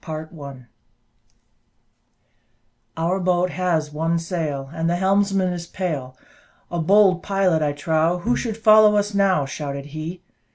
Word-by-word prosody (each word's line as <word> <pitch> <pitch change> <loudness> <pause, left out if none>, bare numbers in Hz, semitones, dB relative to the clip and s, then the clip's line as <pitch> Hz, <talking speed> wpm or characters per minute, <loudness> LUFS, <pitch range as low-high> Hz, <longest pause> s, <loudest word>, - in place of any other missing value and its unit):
Chapter 155 0 -6
XI 140 -5 -10 2.3
"Our 170 +4 0
boat 180 0 +1
has 165 -5 -1
one 165 +2 0
sail, 155 -5 -4
And 165 0 -1
the 175 - +1
helmsman 195 0 +1
is 170 -1 -6
pale; 145 -10 -4 0.5
A 175 - -2
bold 190 +1 +4
pilot, 195 -5 +1
I 145 -1 0
trow 160 +3 0
Who 230 +7 0
should 225 -3 -3
follow 215 -1 +6
us 205 0 0
now," 195 -7 +2
Shouted 140 0 -6
he. 165 +4 -6
170 Hz, 135 wpm, -22 LUFS, 155-190 Hz, 2.3 s, follow